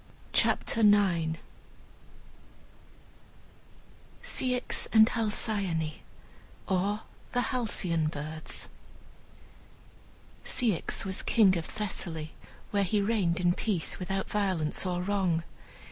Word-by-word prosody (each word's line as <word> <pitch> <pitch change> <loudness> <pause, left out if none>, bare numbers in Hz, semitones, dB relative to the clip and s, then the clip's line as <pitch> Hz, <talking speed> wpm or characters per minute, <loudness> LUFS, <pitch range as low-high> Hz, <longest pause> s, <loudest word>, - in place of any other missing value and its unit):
CHAPTER - - +2
IX 185 -7 +4 2.9
CEYX 250 -1 -1
AND 220 0 +7
HALCYONE: 200 -8 0 0.7
OR, 200 +3 0 0.3
THE 245 - +2
HALCYON 185 -11 0
BIRDS 155 +1 -5 1.8
Ceyx 230 -10 0
was 190 -1 -1
king 200 -5 +4
of 165 -2 -2
Thessaly, 165 -6 -3 0.4
where 205 - +2
he 200 +2 +1
reigned 200 -5 +1
in 175 -1 +3
peace, 185 -4 -1
without 195 +1 -2
violence 185 -5 0
or 180 0 -1
wrong. 185 -4 0
190 Hz, 85 wpm, -29 LUFS, 170-210 Hz, 2.9 s, AND